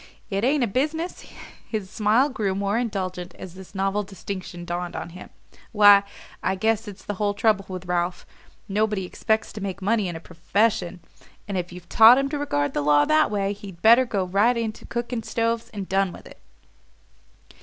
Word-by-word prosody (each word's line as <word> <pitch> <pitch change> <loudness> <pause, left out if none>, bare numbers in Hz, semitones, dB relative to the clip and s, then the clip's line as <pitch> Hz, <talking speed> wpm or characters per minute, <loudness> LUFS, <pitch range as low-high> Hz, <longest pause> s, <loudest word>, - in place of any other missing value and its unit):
It 195 +2 -1
ain't 275 +2 +2
a - - +2
business?" 310 - -2 0.4
His 215 -4 -3
smile 215 +6 +2
grew 210 -9 -2
more 200 +1 -1
indulgent 185 -6 -4
as 180 - -9
this 190 +1 -13
novel 195 +2 0
distinction 190 -3 -7
dawned 175 0 -4
on - - -5
him. 180 +2 -11 0.4
"Why, 205 -2 +8 0.4
I 190 - 0
guess 220 +3 0
that's 200 -2 -10
the 205 - -3
whole 205 -1 +1
trouble 205 -2 +2
with 185 -1 -7
Ralph. 175 0 -2 0.4
Nobody 210 -1 0
expects 220 +4 -1
to 210 - -7
make 195 -1 -4
money 205 +1 +1
in 175 - -5
a - - -5
PROFESSION; 180 +2 -1 0.5
and 200 - -4
if 180 -1 -3
you've 180 -1 -11
taught 225 +3 +8
him 275 0 0
to 295 0 -3
regard 145 - -1
the - - 0
law 145 0 +4
that 310 0 +3
way, 200 -1 -1
he'd 195 -4 -11
better 235 +4 +7
go 200 -5 -1
right 205 +7 +2
into 225 -2 -4
cooking 240 0 -3
stoves 230 0 -1
and 200 -3 -6
done 195 -1 +1
with - - -12
it." - - -14
200 Hz, 185 wpm, -24 LUFS, 185-225 Hz, 0.5 s, Why